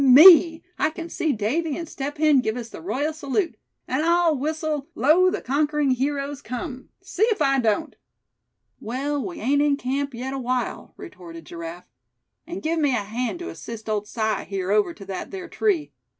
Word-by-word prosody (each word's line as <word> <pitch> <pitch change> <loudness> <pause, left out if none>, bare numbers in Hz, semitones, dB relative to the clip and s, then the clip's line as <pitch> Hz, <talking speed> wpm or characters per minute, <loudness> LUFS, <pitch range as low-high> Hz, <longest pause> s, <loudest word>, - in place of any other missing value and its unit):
me, 320 +4 +8 0.2
I - - +3
can 330 +1 -7
see 320 - 0
Davy 275 +8 -1
and 335 -1 -5
Step 285 +1 -5
Hen 305 -2 +5
give 220 -1 -1
us 235 -2 -6
the - - -10
royal 265 - -1
salute. 315 +4 -1 0.3
And 260 +4 0
I'll 340 -1 +3
whistle 305 0 -2
'Lo, 315 +10 +5
the - - -3
Conquering 295 +1 +1
Heroes 280 +2 -1
Come,' 255 +1 -6
see 380 0 -7
if 440 - 0
I 275 -2 +3
don't." 240 +7 0 0.8
"Well, 275 +5 -2
we 355 -3 -6
ain't 280 +6 +2
in 290 -1 +3
camp 275 0 -2
yet 260 +3 -4
awhile," 255 -2 -3
retorted 165 - -10
Giraffe; 170 +2 -8 0.6
"and 345 +2 -6
give 325 +1 0
me 290 -4 +2
a 215 - -1
hand 235 - -3
to 350 +1 -6
assist 225 -1 -8
old 210 -1 -1
Si 220 0 -1
here 195 -1 -2
over 210 +10 +3
to 205 -12 -11
that 190 -1 -5
there 375 -2 -7
tree. 370 -6 0
280 Hz, 180 wpm, -24 LUFS, 235-315 Hz, 0.8 s, me